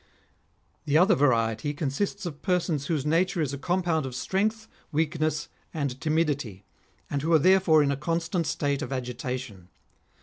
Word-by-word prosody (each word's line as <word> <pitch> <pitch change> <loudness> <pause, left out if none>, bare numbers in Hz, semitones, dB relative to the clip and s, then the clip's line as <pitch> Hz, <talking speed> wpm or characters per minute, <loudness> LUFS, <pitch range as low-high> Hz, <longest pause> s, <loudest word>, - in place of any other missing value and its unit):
The 145 +1 +3
other 185 +5 +5
variety 130 +1 +1
consists 150 +7 -2
of 150 -4 -6
persons 170 -6 0
whose 150 -4 -1
nature 170 +3 +1
is 145 -4 0
a - - -3
compound 175 -4 0
of 125 - -7
strength, 215 - -1 0.2
weakness, 155 -1 0 0.3
and 140 -4 -3
timidity, 145 - -1 0.4
and 140 - -2
who 160 +3 -1
are - - +8
therefore 175 -2 +5
in 140 - +1
a - - 0
constant 165 +2 -1
state 145 -2 -1
of 125 - -5
agitation. 125 -6 -5
150 Hz, 155 wpm, -27 LUFS, 135-170 Hz, 0.4 s, are